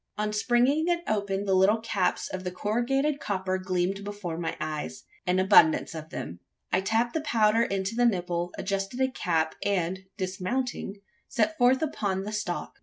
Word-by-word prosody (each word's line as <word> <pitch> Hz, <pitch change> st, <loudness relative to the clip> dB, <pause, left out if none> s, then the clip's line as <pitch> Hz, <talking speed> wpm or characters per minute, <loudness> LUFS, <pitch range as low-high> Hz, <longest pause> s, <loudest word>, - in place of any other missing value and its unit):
On 210 Hz, 0 st, -1 dB
springing 250 Hz, +8 st, +2 dB
it 345 Hz, -1 st, +1 dB
open 200 Hz, -2 st, -1 dB
the 195 Hz, -, +1 dB
little 195 Hz, +4 st, +4 dB
caps 220 Hz, -5 st, 0 dB
of 185 Hz, 0 st, -5 dB
corrugated 270 Hz, +8 st, 0 dB
copper 190 Hz, -4 st, -1 dB
gleamed 185 Hz, +1 st, -1 dB
before 200 Hz, -5 st, -5 dB
my 165 Hz, 0 st, -3 dB
eyes 150 Hz, -, -4 dB, 0.2 s
an 180 Hz, +1 st, +2 dB
abundance 185 Hz, -5 st, +5 dB
of 160 Hz, -1 st, -7 dB
them. 85 Hz, -, -6 dB, 0.3 s
I 185 Hz, -, +4 dB
tapped 225 Hz, +4 st, +1 dB
the 320 Hz, -, 0 dB
powder 225 Hz, -6 st, +3 dB
into 195 Hz, -2 st, -1 dB
the 240 Hz, +1 st, +3 dB
nipple; 175 Hz, -4 st, -1 dB
adjusted 195 Hz, +4 st, -2 dB
a 260 Hz, 0 st, +2 dB
cap; 165 Hz, -9 st, 0 dB
and, 185 Hz, -2 st, 0 dB, 0.2 s
dismounting, 195 Hz, +4 st, -3 dB, 0.3 s
set 260 Hz, +5 st, +1 dB
forth 255 Hz, +4 st, +4 dB
upon 200 Hz, -10 st, -1 dB
the 210 Hz, -, -5 dB
stalk. 205 Hz, -5 st, -4 dB
200 Hz, 165 wpm, -27 LUFS, 185-235 Hz, 0.3 s, abundance